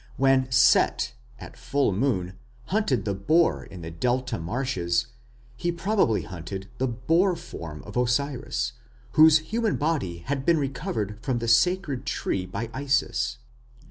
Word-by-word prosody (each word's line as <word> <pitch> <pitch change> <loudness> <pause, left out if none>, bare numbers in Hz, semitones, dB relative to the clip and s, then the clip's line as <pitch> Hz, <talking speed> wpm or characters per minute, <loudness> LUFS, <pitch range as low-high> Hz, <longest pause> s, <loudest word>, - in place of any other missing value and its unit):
When 135 -1 +3
Set 125 -1 +4 0.2
at - - -11
full 140 -5 0
moon 95 -4 0 0.3
hunted 145 - 0
the 100 - 0
boar 155 - +2
in 90 - -11
the 80 - -6
Delta 125 +6 -1
marshes, 85 -2 -1 0.5
he 175 +7 -1
probably 170 - +1
hunted 95 +2 -7
the 130 - +1
boar 165 +10 +2
form 85 - -8
of 105 - -11
Osiris, 125 0 0 0.4
whose 155 +3 +7 0.2
human 225 -3 +1
body 130 - -1
had 135 -1 -2
been 170 +3 +3
recovered 115 -7 -3
from 125 +1 -1
the 115 0 -3
sacred 140 +4 +2
tree 90 -1 -2
by 115 +5 -5
Isis. 135 -2 0
125 Hz, 140 wpm, -26 LUFS, 100-145 Hz, 0.5 s, whose